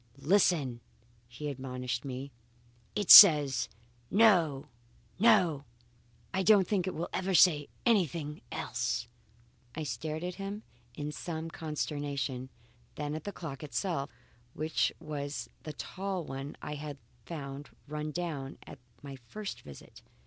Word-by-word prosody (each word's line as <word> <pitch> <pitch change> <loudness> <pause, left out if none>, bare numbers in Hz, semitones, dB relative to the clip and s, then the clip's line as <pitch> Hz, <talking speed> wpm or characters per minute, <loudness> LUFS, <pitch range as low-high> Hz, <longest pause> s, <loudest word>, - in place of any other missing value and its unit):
"Listen!" 145 -6 +2 0.5
he 120 +5 -7
admonished 125 -3 -4
me. 135 +1 -6 0.6
"It 205 -3 +2
still 200 -6 +14
says 135 -3 -2 0.4
No! 180 -10 +4 0.5
No! 185 -10 +4 0.7
I 190 - +1
don't 190 -1 +5
think 195 -4 0
it 185 - -3
will 165 - -3
ever 190 0 0
say 150 -5 +5 0.2
anything 170 - +1
else." 120 -1 -2 0.7
I 160 - -3
stared 155 +2 -4
at 180 0 -3
him 200 +2 -5 0.3
in 150 0 -4
some 160 +1 -5
consternation, 145 -5 -3 0.5
then 150 0 -3
at 155 0 -6
the 205 - -3
clock 150 -8 -7
itself 150 -1 -2 0.5
which 155 +1 0
was 145 -3 -5
the 155 - -7
tall 190 +1 -4
one 135 0 -6
I 150 - -4
had 145 -1 -6 0.3
found 145 -3 -7 0.2
run 150 +1 -4
down 150 -5 -4
at - - -11 0.2
my 140 -1 -8
first 195 - -7
visit. 70 - -13
150 Hz, 130 wpm, -31 LUFS, 140-180 Hz, 0.7 s, still